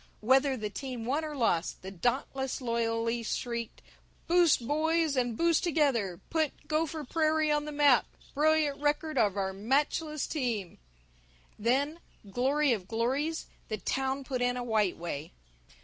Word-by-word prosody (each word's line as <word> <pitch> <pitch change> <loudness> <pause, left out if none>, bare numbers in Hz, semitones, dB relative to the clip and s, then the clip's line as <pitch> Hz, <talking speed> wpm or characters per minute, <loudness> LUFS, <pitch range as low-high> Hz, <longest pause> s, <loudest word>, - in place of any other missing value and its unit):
Whether 265 +4 +3
the 210 -2 -4
team 245 +2 -5
won 285 +6 0
or 305 -1 -5
lost 190 -11 0
the 190 - -6
Dauntless 260 +6 -1
loyally 230 -1 -1
shrieked, 235 0 -4 0.4
"Boost, 340 -8 +4
Boys, 320 0 +1
and 245 -3 0
Boost 335 -1 +3
Together 270 - +1
Put 315 -3 -1
Gopher 310 0 -1
Prairie 310 +1 +1
on 295 0 +1
the 300 - -5
Map 290 -4 +4 0.3
Brilliant 300 -1 +2
Record 300 +1 0
of 205 -1 +2
Our 190 -1 -1
Matchless 285 - 0
Team." 235 - -3 0.8
Then, 275 +8 +1 0.3
glory 265 +6 +2
of 190 -5 -4
glories, 265 +9 -1 0.2
the 215 - -3
town 265 +7 -1
put 260 -2 -3
in 245 0 +1
a 245 - -3
White 215 -5 +1
Way. 165 -2 -5
265 Hz, 145 wpm, -30 LUFS, 230-300 Hz, 0.8 s, Boost